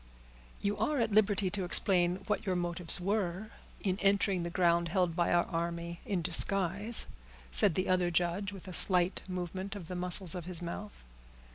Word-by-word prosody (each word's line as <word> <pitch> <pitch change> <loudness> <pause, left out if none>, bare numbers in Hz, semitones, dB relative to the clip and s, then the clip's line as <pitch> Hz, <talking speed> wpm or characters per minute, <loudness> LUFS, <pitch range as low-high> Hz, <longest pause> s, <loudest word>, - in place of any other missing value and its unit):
"You 205 0 -2
are 295 -2 -1
at 230 - -1
liberty 205 -2 +1
to 200 -2 -3
explain 180 0 +1
what 210 +2 -3
your 190 -3 -2
motives 175 -1 -2
were 195 +1 -3 0.3
in 190 -1 -3
entering 195 -2 0
the 170 - -4
ground 170 -1 +1
held 180 -1 -1
by 175 0 0
our 175 0 +2
army 170 0 -5
in 185 -4 -2
disguise," 195 +5 +5 0.5
said 165 - +3
the 185 - -2
other 180 -1 +1
judge, 175 +4 -2
with 195 -1 -12
a 185 - -8
slight 180 0 +4
movement 185 +2 -6
of 175 -5 -9
the 180 - -6
muscles 180 0 0
of 180 -3 -7
his 180 -2 -4
mouth. 190 +4 -9
185 Hz, 175 wpm, -30 LUFS, 175-200 Hz, 0.5 s, disguise